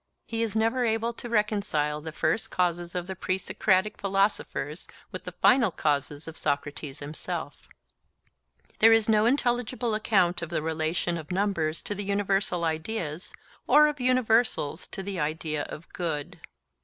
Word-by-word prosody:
He 230 0 -3
is 225 -2 -1
never 225 +3 +2
able 230 0 0
to 240 - -8
reconcile 200 -9 0
the 160 +1 -6
first 210 +6 0
causes 175 -1 -1
of 180 -1 -2
the 190 +1 -5
pre 185 0 -1
Socratic 190 +1 +1
philosophers 195 -6 0 0.2
with - - -7
the - - -5
final 250 -4 +4
causes 145 -2 -1
of 160 - -5
Socrates 145 0 -2
himself. 150 0 -6 1.1
There 225 +1 +8
is 225 -1 +4
no 220 0 +4
intelligible 245 -2 0
account 195 -5 +2
of 170 - -4
the 165 -3 -2
relation 160 +2 -1
of 155 - -10
numbers 180 -5 0
to - - -2
the 205 0 -4
universal 195 -3 0
ideas, 160 0 -3 0.4
or 300 - +7
of 300 -2 -1
universals 230 - +2
to 195 - -6
the 195 -2 -4
idea 155 0 -2
of 160 - -9
good. 160 -5 -3
190 Hz, 155 wpm, -27 LUFS, 160-220 Hz, 1.1 s, There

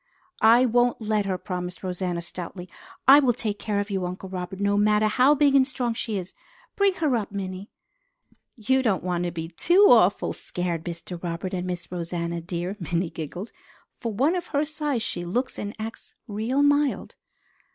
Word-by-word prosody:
"I 230 +3 +6
won't 245 0 +2
let 215 -2 0
her," 185 -1 -1
promised 180 -1 -5
Rosanna 180 -1 -2
stoutly. 180 +1 -7 0.4
"I 275 +2 +10
will 260 -4 +3
take 215 -3 -3
care 210 -2 -1
of 205 +1 -3
you, 190 -2 -1
Uncle 180 +1 -5
Robert, 185 0 -5
no 200 0 +2
matter 210 +1 +3
how 255 +7 +4
big 285 -1 +4
and 265 -1 +5
strong 245 -3 -2
she 220 -2 -3
is. 185 0 -6 0.4
Bring 400 -2 +3
her 300 -7 +1
up, 210 -4 -2
Minnie." 190 0 -5 0.9
"You 260 +3 +1
don't 220 -7 +1
want 175 -1 -1
to 175 - -2
be 165 -1 -5
too 350 - +4
awful - - +4
scared, 175 -2 -4
Mr. 170 0 -6
Robert 175 +2 -4
and 180 0 -2
Miss 180 -1 -5
Rosanna 170 -1 -3
dear," 175 +3 -4
Minnie 170 0 -2
giggled. 175 +7 -6 0.5
"For 230 -2 -3
one 275 - +2
of 360 -1 -3
her 290 +2 0
size, 295 -6 -2
she 175 - -3
looks 245 +10 -2
and 205 0 -5
acts 220 0 -7
real 225 +6 0
mild." 290 -1 +2
205 Hz, 185 wpm, -25 LUFS, 180-245 Hz, 0.9 s, I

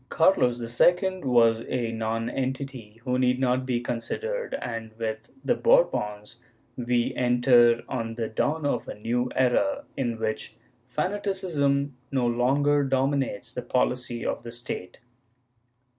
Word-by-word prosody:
^ - - -40
Carlos 160 -8 +3 0.2
II 185 +1 +3
was 115 -3 +4
a 115 -2 -1
nonentity 115 +1 -3
who 125 -1 0
need 125 0 +2
not 130 0 +1
be 125 -2 +1
considered 450 - -3
and, 115 -2 -5
with 110 -1 -4 0.2
the - - +3
Bourbons, 115 - +1 0.4
we 120 -1 0
enter 120 -1 +4
on 115 -3 -3
the 115 -1 -2
dawn 150 +7 -1
of 145 - -1
a - - -6
new 120 +4 -1
era, 275 - +2
in 120 -4 -1
which 110 -1 -3 0.3
fanaticism 150 -4 -1 0.2
no 130 -3 +1
longer 140 +5 +2
dominates 135 -3 0
the 125 - -3
poHcy 125 -1 -1
of - - -2
the 115 - -8
State. 115 -6 -7
125 Hz, 130 wpm, -26 LUFS, 115-140 Hz, 0.4 s, was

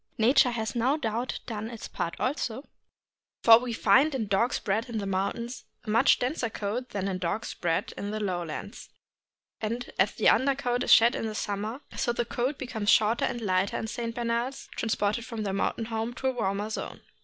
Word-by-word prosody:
Nature 250 +3 +5
has 220 -3 -3
no 250 +5 +2
doubt 235 -2 -2
done 220 -1 -4
its 230 -2 -7
part 170 - -3
also, 255 -1 -2 0.8
for 225 0 +9
we 250 0 -4
find 265 +7 +4
in 235 -5 -1
dogs 205 +5 +1
bred 220 +5 -1
in 230 - -3
the 205 - -2
mountains 200 +6 -2 0.2
a 215 - -4
much 230 +5 +5
denser 250 -2 -1
coat 220 +4 -3
than 200 -1 -2
in 185 -2 -2
dogs 185 +6 -2
bred 165 -2 -1
in 200 - -4
the 215 +1 -3
low 185 -4 -1
lands; 170 +5 -7 0.7
and, 230 +3 -3
as - - +3
the - - +2
under 275 +1 +4
coat 245 -2 -1
is - - +1
shed 235 +1 +7
in 220 - -2
summer, 215 +6 -3
so 240 - 0
the 235 0 -1
coat 255 +4 -2
becomes 225 -6 -3
shorter 220 +2 +4
and 240 - -3
lighter 190 -2 +1
in - - -3
St. 230 0 -4
Bernards 240 +2 -2
transported 220 0 0
from 225 -2 -5
their 195 -2 -2
mountain 210 +3 -1
home 225 0 -2
into 245 +2 -8
a 260 - +4
warmer 205 -2 -2
zone. - - -5
225 Hz, 200 wpm, -28 LUFS, 205-245 Hz, 0.8 s, for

